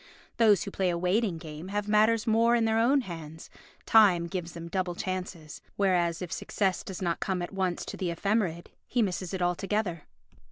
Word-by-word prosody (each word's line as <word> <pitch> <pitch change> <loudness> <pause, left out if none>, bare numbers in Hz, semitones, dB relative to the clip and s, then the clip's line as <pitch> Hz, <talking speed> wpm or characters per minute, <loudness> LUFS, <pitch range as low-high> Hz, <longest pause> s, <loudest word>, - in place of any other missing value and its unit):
Those 215 -4 +5
who 200 - -6
play 190 -2 0
a 170 - 0
waiting 185 +1 +1
game 155 +1 -8
have 205 +1 -2
matters 215 +1 +3
more 230 +1 +4
in 230 -1 +2
their 225 0 +2
own 265 +5 +4
hands, 165 -6 -9 0.3
time 195 -6 +5
gives 170 -1 -5
them 170 0 -7
double 180 0 -2
chances; 185 -5 -5
whereas 180 -3 +1
if 175 - -7
success 190 -3 -1
does 190 0 -6
not 170 -1 -1
come 185 -2 -1
at 175 - -6
once 185 -2 -1
to - - -7
the 185 - -2
ephemerid 175 -1 -1 0.2
he 245 -2 +1
misses 185 -2 -3
it 185 -2 -2
altogether. 180 -1 -1
185 Hz, 190 wpm, -28 LUFS, 170-210 Hz, 0.3 s, Those